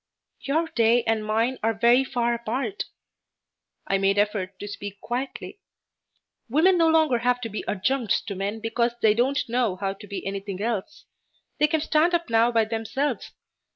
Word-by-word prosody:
"Your 320 +4 0
day 230 +1 +3
and 225 -2 0
mine 225 +4 0
are 225 +1 +1
very 240 +4 +4
far 240 -3 0
apart." 240 - -3 1.0
I 195 - +1
made 195 +1 +2
effort 205 -2 0
to 205 - -7
speak 200 -1 -7
quietly. 260 - -5 0.9
"Women 325 +9 +4
no 330 - +5
longer 315 -6 +3
have 245 +1 +1
to 230 - -4
be 210 - -5
adjuncts 220 +3 0
to 205 - -6
men 200 +3 -3
because 235 +1 0
they 215 -1 +6
don't 260 +5 +1
know 235 -5 0
how 195 +1 -2
to 200 +1 -13
be 200 - -6
anything 195 -1 -4
else. 225 +4 -3 0.5
They 300 - +5
can 315 0 0
stand 320 +3 +2
up 340 -8 -2
now 230 +1 +4
by 225 -2 +3
themselves. 230 +5 -2
230 Hz, 170 wpm, -25 LUFS, 210-265 Hz, 1.0 s, they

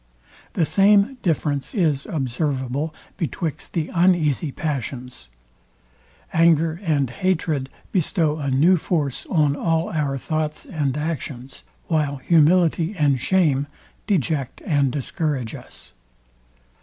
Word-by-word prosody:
The 165 - +2
same 205 - +4
difference 145 - -1
is 155 -8 +1
observable 135 0 -2 0.3
betwixt 165 -2 -4
the 160 -2 -2
uneasy 170 -5 +2
passions. 125 - -5 1.0
Anger 165 0 +3
and 150 -7 +1
hatred 160 -5 -1 0.2
bestow 160 -3 +1
a 140 -3 -2
new 160 +8 +4
force 150 -5 -2
on 150 -5 +2
all 165 +2 0
our 145 -4 -1
thoughts 155 +2 -3
and 145 -4 -2
actions; 145 -4 -5 0.2
while 150 -4 0
humility 165 +4 +3
and 140 -3 +2
shame 145 -4 +2 0.4
deject 155 - 0
and 140 -4 +2
discourage 140 -3 -2
us. - - -13
155 Hz, 105 wpm, -22 LUFS, 140-170 Hz, 1.0 s, same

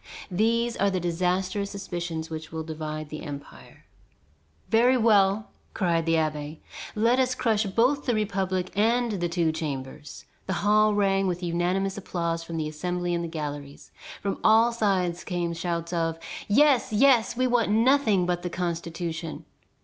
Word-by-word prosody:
These 230 +5 +1
are 200 - +2
the 190 -1 -1
disastrous 185 +4 -1
suspicions 175 -5 -5
which 155 -1 -6
divide 155 -1 -5
the 155 - -7
empire. 145 -3 -10 0.8
"Very 245 +3 +4
well!" 210 -2 +3 0.2
cried 170 -4 +1
the 165 - +3
abbé, 155 -1 -2 0.4
"let 230 +4 +3
us 255 -1 +1
crush 220 -4 +1
both 250 +8 +1
the 240 - +2
republic 190 -3 -1
and 230 +3 +2
the 175 -4 -2
Two 170 -2 +1
Chambers." 145 -2 -6 0.2
The 190 - -1
hall 215 0 +4
rang 195 -1 +2
with 180 0 -2
unanimous 180 +3 -1
applause 170 -3 -2
from 165 0 -6
the 155 -1 -1
Assembly 175 +3 -2
and 170 0 -1
the - - -3
galleries. 145 -3 -6 0.3
From 200 -1 -2
all 225 +2 +5
sides 190 -6 0
came 175 -2 -2
shouts 170 0 -3
of 165 -1 0 0.3
"Yes, 270 +3 +4
yes, 235 0 +4
we 255 - +2
want 245 -3 +2
nothing 225 -3 +3
but 175 0 -1
the 180 - -3
Constitution." 170 -1 -4
180 Hz, 150 wpm, -26 LUFS, 165-215 Hz, 0.8 s, all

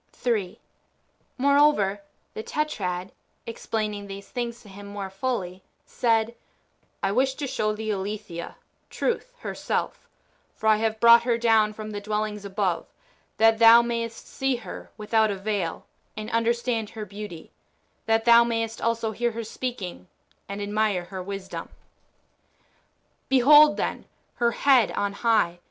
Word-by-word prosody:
3. 215 -7 -2 0.8
IMoreover, 280 -8 +3 0.3
the - - -5
Tetrad, 190 -11 -3 0.3
explaining 215 -3 -4
these 195 0 -9
things 240 -1 -4
to - - -16
him 200 +1 -11
more 200 -1 -6
fully, 195 -4 -3 0.2
said: 225 -1 +1 0.4
— - - -42
I 195 - +1
wish 265 +4 +1
to 290 - -4
show 215 -5 -1
thee 220 0 -3
Aletheia 200 -3 -5 0.3
(Truth) - - -2
her - - -4
self; - - -3 0.5
for - - -9
I 215 -1 +5
have 220 0 -1
brought 235 0 +8
her 235 -1 +1
down 225 -2 +3
from 215 0 -7
the 205 -1 -5
dwellings 210 0 -3
above, 190 -3 -1 0.5
that 225 0 +4
thou 230 +1 +8
mayest 230 -1 -4
see 270 -1 -1
her 220 -7 -9
without 220 0 +2
a 200 - -1
veil, 195 -3 -3 0.3
and 215 0 -5
understand 230 -1 0
her 220 -1 -7
beauty 200 -4 -9 0.3
— - - -43
that 225 0 +2
thou 235 0 +8
mayest 225 -1 -2
also 230 -1 0
hear 235 +1 -1
her 230 +1 -4
speaking, 220 -6 -6 0.4
and 200 +1 -4
admire 205 -3 0
her 185 +1 -7
wisdom. 195 0 -6 1.6
Behold, 295 +3 +7
then, - - -3 0.3
her 235 -1 +3
head 255 -4 +4
on 200 0 -1
high. 200 -6 +1
220 Hz, 145 wpm, -25 LUFS, 200-235 Hz, 1.6 s, brought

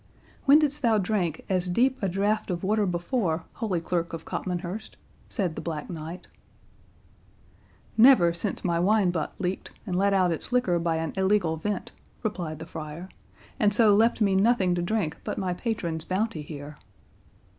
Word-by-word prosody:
"When 280 +1 +8
didst 300 -1 +1
thou 230 -4 +3
drink 180 -5 -1
as 185 -1 0
deep 250 +8 +2
a 195 - +1
drought 205 +4 0
of 175 0 -3
water 210 +1 +2
before, 175 -2 -1 0.2
Holy 195 -6 0
Clerk 170 0 -2
of 165 -1 -6
Copmanhurst?" 180 +4 -4 0.3
said 185 -8 -1
the - - -6
Black 160 +1 -5
Knight. 165 +2 -7 1.7
"Never 220 -8 +7
since 195 +4 -3
my 170 -2 +1
wine 195 0 +3
butt 165 -4 -3
leaked, 180 +1 -3
and 185 -4 -2
let 200 +2 +3
out 185 -3 +3
its 165 - -4
liquor 220 -9 +2
by 165 -1 0
an 160 -1 -2
illegal 190 -4 +2
vent," 195 +4 -3 0.3
replied 175 -8 -3
the 160 - -8
friar, 160 +2 -7 0.5
"and 205 -1 +3
so 215 -2 +6
left 230 +2 +3
me 200 -2 +3
nothing 195 -2 +3
to 175 - 0
drink 175 -3 -1
but - - -4
my 185 -2 -1
patron's 175 -6 -3
bounty 185 -2 -1
here." 145 -1 -8
185 Hz, 165 wpm, -27 LUFS, 170-210 Hz, 1.7 s, When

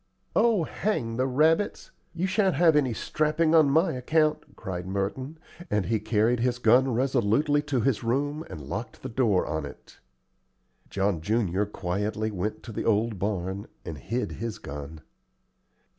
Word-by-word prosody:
"Oh, 220 -5 +4
hang 120 - -2
the 130 +1 +1
rabbits! 160 +9 +1 0.2
You 175 +2 0
shan't 190 -1 +2
have 165 -2 +5
any 140 -4 +3
strapping 155 +7 0
on 155 -3 +6
my 160 +6 +3
account," 155 +4 0
cried 90 -1 -5
Merton; 100 +10 -3 0.3
and 105 -3 +1
he 110 -1 0
carried 110 +3 +1
his 120 +1 +1
gun 125 +3 +4
resolutely 130 +4 +2
to 145 -4 -1
his 130 -3 +1
room 145 +6 -1
and 80 - -7
locked 100 - -6
the 130 - -4
door 115 -6 +2
on 75 0 -2
it. 70 - -11 0.9
John 95 -4 0
junior 100 0 0
quietly 105 +3 -2
went 100 +2 -3
to 115 - -8
the - - -3
old 110 -1 +1
barn, 95 0 -2 0.2
and 80 - -5
hid 120 +3 -3
his 115 -1 -5
gun. 75 +2 -8
115 Hz, 155 wpm, -27 LUFS, 100-145 Hz, 0.9 s, on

